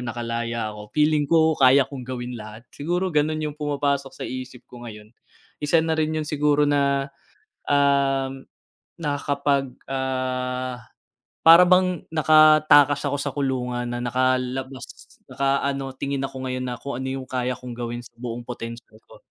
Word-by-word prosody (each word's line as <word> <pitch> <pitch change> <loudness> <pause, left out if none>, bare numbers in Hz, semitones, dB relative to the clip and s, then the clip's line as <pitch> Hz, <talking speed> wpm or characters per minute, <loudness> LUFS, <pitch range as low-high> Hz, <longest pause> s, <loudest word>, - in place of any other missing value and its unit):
nakalaya 115 -2 -3
ako 105 0 -11
feeling 150 0 +2
ko 160 -1 +4
kaya 135 -2 +5
kong 135 -2 -8
gawin 125 0 -6
lahat. 110 +2 -10
Siguro 175 +5 -1
ganun 155 +1 +1
yung 150 -1 -4
pumapasok 140 -2 -1
sa - - -8
isip 130 -1 -8
ko 120 -1 -13
ngayon. 105 -1 -11 0.5
Isa 155 +3 +3
na 160 - 0
rin 155 0 0
yun 155 - -3
siguro 150 0 +2
na, 140 -1 +1 0.6
uhm, 135 -1 +1 0.6
nakakapag, 140 -2 0 0.2
ah, 130 -1 -3 0.6
para 165 +2 +8
bang 180 -1 +3
nakatakas 155 -2 +6
ako - - -1
sa 140 - -3
kulungan 125 -3 -2
na 120 0 -4
nakalabas, 130 +1 -1 0.4
naka 140 0 0
ano 135 -1 -3
tingin 140 0 -3
ako 135 -1 -5
ngayon 130 0 -3
na 125 - -3
kung 140 -2 -6
ano 130 - -4
yung 135 0 -4
kaya 125 0 -2
kong 125 -1 -8
gawin 120 0 -5
sa - - -15
buong 120 -1 -5
potensyal 115 -2 -8
ko. - - -17
135 Hz, 150 wpm, -23 LUFS, 125-145 Hz, 0.6 s, para